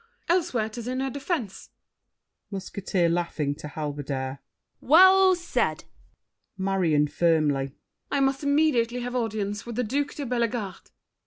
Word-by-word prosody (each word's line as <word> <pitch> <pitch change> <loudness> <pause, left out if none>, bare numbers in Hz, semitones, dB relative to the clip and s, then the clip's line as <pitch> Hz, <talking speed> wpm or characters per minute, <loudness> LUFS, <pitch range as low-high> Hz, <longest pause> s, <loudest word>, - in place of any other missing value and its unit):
Elsewhere, 320 -11 +1
'tis 230 +1 -7
in 255 +1 -2
her 270 0 -1
defense. 270 - -4 0.8
MUSKETEER 195 -2 -1
(laughing, 165 -4 -1
to 150 +1 -9
Halberdier). 140 -3 -4 0.4
Well 375 +5 +7
said! 345 0 -1 0.7
MARION 180 -6 +2
(firmly). 145 -5 +1 0.4
I 280 - 0
must 270 0 +1
immediately 285 -5 +2
have 245 +1 -4
audience 210 -3 -2
With 235 - -5
the 250 - 0
Duke 285 +6 -2
de 285 - -4
Bellegarde. 235 -4 -2
220 Hz, 125 wpm, -26 LUFS, 170-270 Hz, 0.8 s, Well